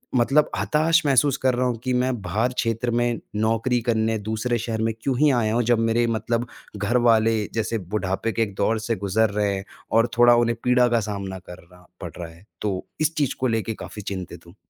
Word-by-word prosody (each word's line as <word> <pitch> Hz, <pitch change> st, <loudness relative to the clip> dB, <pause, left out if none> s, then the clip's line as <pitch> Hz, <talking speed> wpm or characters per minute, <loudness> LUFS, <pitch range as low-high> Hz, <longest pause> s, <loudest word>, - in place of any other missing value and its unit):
मतलब 135 Hz, +5 st, +3 dB
हताश 160 Hz, +2 st, +2 dB
महसूस 140 Hz, 0 st, +3 dB
कर 130 Hz, -, +4 dB
रहा 125 Hz, +1 st, 0 dB
हूँ 120 Hz, -2 st, -2 dB
कि 130 Hz, -1 st, -1 dB
मैं 125 Hz, +1 st, +1 dB
बाहर 110 Hz, +8 st, -1 dB
क्षेत्र 115 Hz, 0 st, -1 dB
में 120 Hz, -1 st, 0 dB, 0.2 s
नौकरी 115 Hz, +3 st, +1 dB
करने 110 Hz, -1 st, 0 dB
दूसरे 110 Hz, +3 st, -2 dB
शहर 110 Hz, -1 st, -3 dB
में 115 Hz, 0 st, 0 dB
क्यों 135 Hz, -3 st, -1 dB
ही 150 Hz, 0 st, +5 dB
आया 110 Hz, -3 st, +1 dB
हूँ 120 Hz, +1 st, +2 dB
जब 115 Hz, -, +3 dB
मेरे 115 Hz, +1 st, +2 dB
मतलब 115 Hz, +1 st, -1 dB, 0.3 s
घरवाले, 115 Hz, 0 st, +2 dB
जैसे 115 Hz, 0 st, -1 dB
बुढ़ापे 95 Hz, +3 st, -2 dB
के 115 Hz, -, -2 dB
एक 100 Hz, -3 st, -5 dB
दौर 110 Hz, 0 st, +1 dB
से 115 Hz, +1 st, -2 dB
गुजर 100 Hz, +3 st, +1 dB
रहे 100 Hz, -1 st, 0 dB
हैं 95 Hz, +1 st, -6 dB, 0.3 s
और 115 Hz, +2 st, +4 dB
थोड़ा 120 Hz, 0 st, +7 dB
उन्हें 115 Hz, -1 st, +1 dB
पीड़ा 125 Hz, 0 st, +4 dB
का 120 Hz, -1 st, +2 dB
सामना 100 Hz, -3 st, -5 dB
करना 90 Hz, 0 st, -14 dB, 0.2 s
पड़ 85 Hz, -3 st, -6 dB
रहा 85 Hz, -1 st, -6 dB
है। 90 Hz, +5 st, -19 dB, 0.2 s
तो 95 Hz, -3 st, -2 dB, 0.2 s
इस 155 Hz, +1 st, +1 dB
चीज 145 Hz, -3 st, 0 dB
को 130 Hz, -, -1 dB
लेकर 115 Hz, -1 st, -1 dB
काफ़ी 105 Hz, -, -8 dB
चिंतित 95 Hz, -3 st, -7 dB
हूँ। 85 Hz, -, -16 dB
115 Hz, 210 wpm, -23 LUFS, 105-120 Hz, 0.3 s, थोड़ा